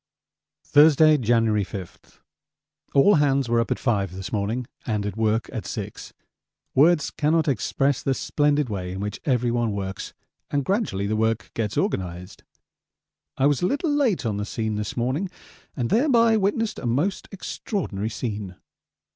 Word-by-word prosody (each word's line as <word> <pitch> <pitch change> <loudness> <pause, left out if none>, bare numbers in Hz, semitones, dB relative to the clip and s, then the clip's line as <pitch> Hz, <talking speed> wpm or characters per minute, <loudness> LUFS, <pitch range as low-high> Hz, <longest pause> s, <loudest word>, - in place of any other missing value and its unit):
Thursday, 155 +1 +6
January 115 -5 +2
5. 95 -1 -10 0.7
All 140 +9 +6
hands 140 -3 +2
were 115 0 +2
up 115 - 0
at - - 0
5 100 -7 0
this 95 0 -7
morning 110 +4 -1 0.2
and 105 -3 -2
at 100 -2 -3
work 110 0 +1
at - - -5
6. - - -6 0.6
Words 155 +3 +4
cannot 155 +2 +1
express 135 +2 0
the 135 - 0
splendid 145 0 +1
way 90 -4 -4
in 95 - -5
which 105 0 -4
everyone 120 -4 +1
works 95 -1 -5 0.3
and 140 -2 -1
gradually 190 - 0
the 105 +2 0
work 110 +1 0
gets 105 -3 -2
organised. 90 0 -3 0.9
I 135 - +2
was 145 -2 +2
a 180 - +2
little 290 - 0
late 260 - +1
on 105 -3 -1
the 105 - -2
scene 110 -1 -3
this 105 +2 -4
morning, 130 +11 -1 0.5
and 120 -3 -1
thereby 230 -3 +4
witnessed 215 +2 0
a - - -4
most 150 +12 0
extraordinary 170 - -4
scene. 105 -5 -5
120 Hz, 155 wpm, -24 LUFS, 105-150 Hz, 0.9 s, Thursday